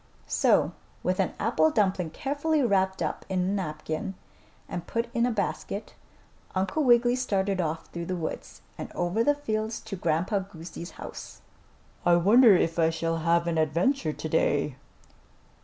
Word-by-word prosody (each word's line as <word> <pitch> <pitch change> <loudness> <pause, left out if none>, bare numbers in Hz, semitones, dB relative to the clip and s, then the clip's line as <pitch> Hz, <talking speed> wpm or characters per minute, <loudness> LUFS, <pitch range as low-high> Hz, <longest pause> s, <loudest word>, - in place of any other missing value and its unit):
So - - +3 0.3
with - - 0
an - - 0
apple 315 - +3
dumpling 190 - +1
carefully 285 - 0
wrapped 190 -4 +1
up - - -3
in 190 -1 0
a - - +1
napkin 180 -2 -3 0.5
and 175 -1 -5
put 230 0 -1
in 235 -1 +2
a - - 0
basket, 205 -1 -3 0.6
Uncle 190 +11 0
Wiggily 240 -1 +5
started 195 -6 0
off 160 -1 -3
through 170 -1 -6
the 185 - -1
woods 165 -3 -6 0.2
and - - -6
over 175 +6 0
the 290 +3 +3
fields 220 -5 -2
to 195 - -6
Grandpa 175 +3 0
Goosey's 175 -2 -8
house. - - -9 0.6
"I 175 - +5
wonder 210 +5 +7
if 165 -1 +1
I 160 -1 +4
shall 165 0 -1
have 170 +1 +2
an 165 -1 0
adventure 165 - +1
today?" 150 -3 0
190 Hz, 155 wpm, -27 LUFS, 165-225 Hz, 0.6 s, wonder